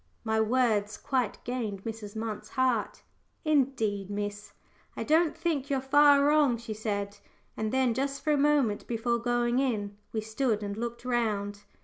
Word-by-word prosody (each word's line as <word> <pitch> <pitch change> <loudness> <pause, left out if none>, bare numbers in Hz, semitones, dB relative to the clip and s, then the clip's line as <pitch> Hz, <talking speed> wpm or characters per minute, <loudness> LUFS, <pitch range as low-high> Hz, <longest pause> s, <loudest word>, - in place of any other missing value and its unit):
My 220 -1 +1
words 220 -3 +1
quite 255 -6 -1
gained 220 -6 -3
Mrs. 220 -2 -6
Munt's 220 -1 -4
heart. 255 -5 0 0.4
"Indeed, 245 -10 +1
miss, 205 0 -4 0.4
I - - -2
don't 320 +1 +2
think 300 -5 -1
you're 275 -1 +1
far 285 +1 +5
wrong," 295 -5 +4
she 230 -1 -6
said. 205 -1 -3 0.4
And 215 0 -2
then, 260 -2 +2
just 275 +2 -2
for 305 - +2
a - - +4
moment 280 -7 +2
before 235 0 0
going 240 +1 +1
in, 210 -7 -1 0.2
we 220 - -1
stood 220 0 -1
and 200 0 -3
looked 235 +2 -5
round. 210 -5 -1
235 Hz, 155 wpm, -29 LUFS, 210-265 Hz, 0.4 s, far